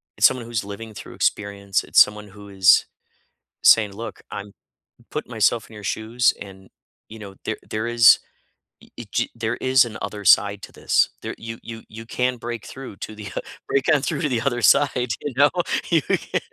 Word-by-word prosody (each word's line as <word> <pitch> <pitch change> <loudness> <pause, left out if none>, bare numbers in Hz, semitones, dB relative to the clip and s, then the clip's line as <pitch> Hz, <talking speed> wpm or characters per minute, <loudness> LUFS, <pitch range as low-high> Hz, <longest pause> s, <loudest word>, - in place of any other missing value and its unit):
it's - - +7
someone 125 -3 -4
who's 115 -2 -3
living 110 +2 -8
through - - -10
experience. 100 -1 -1
It's - - +3
someone 105 0 +4
who 100 +1 -13
is 95 -1 +5 0.8
saying, 105 -3 +6
"Look, 115 +4 -8
I'm 100 0 -7 0.6
put - - -5
myself 115 -1 +1
in 110 - -13
your 105 - -11
shoes, 115 +5 +1
and, 95 -1 -11 0.4
you 110 - -11
know, 100 -2 -10
there - - -2
there 110 +1 -2
is 120 -1 +6 0.6
ee - - -12
gee - - -1
there 115 -1 -2
is 130 0 +4
an 115 -3 -7
other 105 -1 -6
side 100 +3 +4
to - - -9
this. - - +2
There - - -4
you 115 0 -7
you 115 -1 -9
you 115 +1 -10
can 125 +1 -1
break 115 -1 -6
through 130 -7 -9
to 110 - -8
the 105 -1 -8
uh, - - -1 0.3
break 135 - 0
on 145 - +3
through - - -2
to 150 - 0
the 120 -3 0
other 120 -2 -1
side. 125 -2 +3
You 145 - -4
know?" 145 +2 +5 0.4
You 165 - +4
can - - -1
110 Hz, 195 wpm, -22 LUFS, 100-120 Hz, 0.8 s, it's